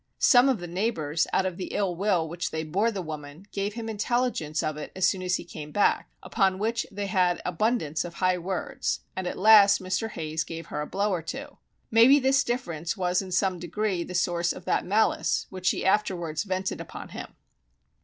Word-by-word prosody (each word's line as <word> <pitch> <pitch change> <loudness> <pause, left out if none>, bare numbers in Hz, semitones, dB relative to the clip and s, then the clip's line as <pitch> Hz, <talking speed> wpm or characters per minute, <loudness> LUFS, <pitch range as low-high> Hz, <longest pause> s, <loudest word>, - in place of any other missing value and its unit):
Some 250 0 +6
of 260 - +2
the 175 - -7
neighbours 170 -4 -1
out 190 - +2
of 185 0 -3
ill 190 -4 -1
will 180 -3 +1
which 170 +1 -3
they 160 0 -3
bore 190 +9 +1
the 200 -5 -4
woman, 155 +2 -8
gave 200 +1 -3
him 230 -1 -5
intelligence 220 - -1
of 155 -1 -1
it 150 - -7
as 190 0 +3
soon 190 -1 0
as 180 0 0
he - - -4
came 155 -3 -9
back, 205 - +2
upon 190 -3 +1
which 230 +3 -1
they 200 0 -4
had 180 -2 +2
abundance 180 -4 0
of 170 -1 -8
high 185 0 +1
words, 180 0 -3
and 185 -1 -3
at - - -4
last 205 -1 +7
Mr. 185 +4 -2
Hayes 160 -4 -3
gave 165 -1 -7
her 150 - -4
a 150 - -4
blow 205 +1 0
or 180 -3 -1
two. 270 - -7 0.3
Maybe 235 +5 +7
this 270 0 +3
difference 175 -7 -3
was 180 0 +1
in 190 -1 -8
some 185 0 +1
degree 180 +1 -2
the 180 - -7
source 175 -1 +1
of - - -11
that - - +1
malice 210 +4 +2
which 185 -1 -5
she - - +1
afterwards 185 -4 0
vented 190 -1 -2
upon - - -9
him. - - -8
185 Hz, 205 wpm, -27 LUFS, 170-210 Hz, 0.3 s, last